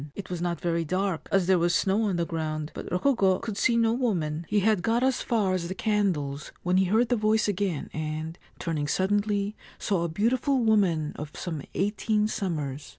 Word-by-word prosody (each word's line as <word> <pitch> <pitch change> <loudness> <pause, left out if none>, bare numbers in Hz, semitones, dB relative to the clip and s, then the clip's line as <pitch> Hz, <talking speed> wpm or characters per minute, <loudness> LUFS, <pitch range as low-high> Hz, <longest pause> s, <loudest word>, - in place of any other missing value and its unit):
It 200 - -7
was 175 -2 -3
not 175 -1 -1
very 170 -2 0
dark, 185 +1 -2
as 195 -2 +3
there 185 0 +4
was 175 +1 +2
snow 200 +3 +2
on 195 -3 0
the 170 0 0
ground; 155 -2 -3
but - - -7
Rokugo 190 -1 +3
could 220 -3 -5
see 235 +3 +2
no 225 -1 +3
woman. 170 -10 -1
He 210 -1 +2
had 210 -2 +2
got 230 +4 +1
as 260 -1 +2
far 210 -5 +1
as 175 -2 -1
the 185 - -4
candles 180 -10 -1
when 180 +1 +2
he 190 - +4
heard 220 +5 +2
the 245 - +3
voice 215 0 +2
again, 195 -6 -1
and, 155 +1 -4 0.2
turning 155 -4 -2
suddenly, 205 +3 0 0.2
saw 190 -5 0
a 170 - -1
beautiful 250 - +1
woman 195 -10 +2
of 150 0 -5
some 160 -5 -4
eighteen 210 +2 +1
summers. 150 -9 -3
190 Hz, 200 wpm, -27 LUFS, 165-215 Hz, 0.2 s, there